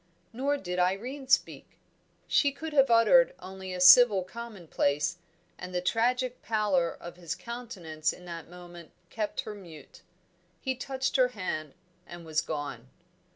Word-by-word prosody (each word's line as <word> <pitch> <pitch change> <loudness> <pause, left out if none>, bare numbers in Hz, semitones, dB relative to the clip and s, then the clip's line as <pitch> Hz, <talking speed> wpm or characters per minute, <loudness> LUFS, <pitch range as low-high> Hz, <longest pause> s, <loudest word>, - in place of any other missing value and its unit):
Nor 275 +4 0
did 180 -7 -4
Irene 235 +10 -1
speak; 265 - 0 0.5
she 285 - +3
could 315 +3 -7
have 275 -2 +4
uttered - - +5
only 190 0 -9
a 180 - -5
civil 195 +2 +8
commonplace, 180 -7 -2 0.4
and 180 0 -7
the - - +2
tragic 245 +6 0
pallor 205 -6 +1
of 175 +1 -10
his 170 -1 -5
countenance 180 -7 -4
in 180 - -13
that 170 -2 -8
moment 175 -1 -12 0.2
kept 215 -2 -2
her 215 - -7
mute. 175 -7 -13 0.6
He 265 - -2
touched 265 +1 -2
her 255 -1 +5
hand 185 - -5 0.3
and 175 -1 -10
was 155 -1 0
gone. 145 -5 -6
190 Hz, 145 wpm, -29 LUFS, 175-250 Hz, 0.6 s, civil